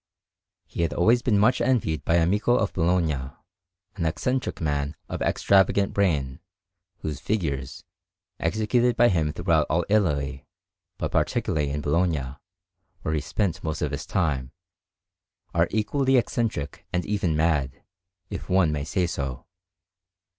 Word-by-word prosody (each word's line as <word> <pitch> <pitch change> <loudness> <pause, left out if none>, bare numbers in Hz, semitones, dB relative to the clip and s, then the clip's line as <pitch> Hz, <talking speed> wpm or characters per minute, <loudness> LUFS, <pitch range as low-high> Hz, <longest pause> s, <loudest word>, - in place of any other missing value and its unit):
He - - -5
had 85 -3 0
always 115 +8 +4
been 110 -5 +2
much 120 +5 +3
envied 115 - +1
by 80 - +2
Amico 100 +8 +2
of 110 -4 0
Bologna, 80 -7 +1 0.7
an 90 - -2
eccentric 125 +10 -2
man 75 -1 -1
of - - -5
extravagant 100 0 +3
brain, 75 -9 0 0.6
whose 75 -2 -4
figures, 75 - -3 0.6
executed 110 +7 +1
by 120 +1 +6
him 80 -5 +1
throughout 80 -1 +1
all 80 +2 +1
Italy, 70 -10 0 0.5
but - - -3
particularly 75 -2 0
in 75 +1 -2
Bologna, 75 -4 0 0.7
where 80 - -1
he 75 - 0
spent 90 -3 -2
most 80 -1 -2
of - - -1
his - - -5
time, 70 -8 -1 1.0
are 85 0 +3
equally 130 +5 +1
eccentric 115 - -1
and 90 0 -1
even 95 -6 0
mad, 75 -5 0 0.5
if - - -6
one 90 -4 +3
may 75 -1 -2
say 90 +4 0
so. 70 -7 -4
85 Hz, 135 wpm, -25 LUFS, 75-100 Hz, 1.0 s, by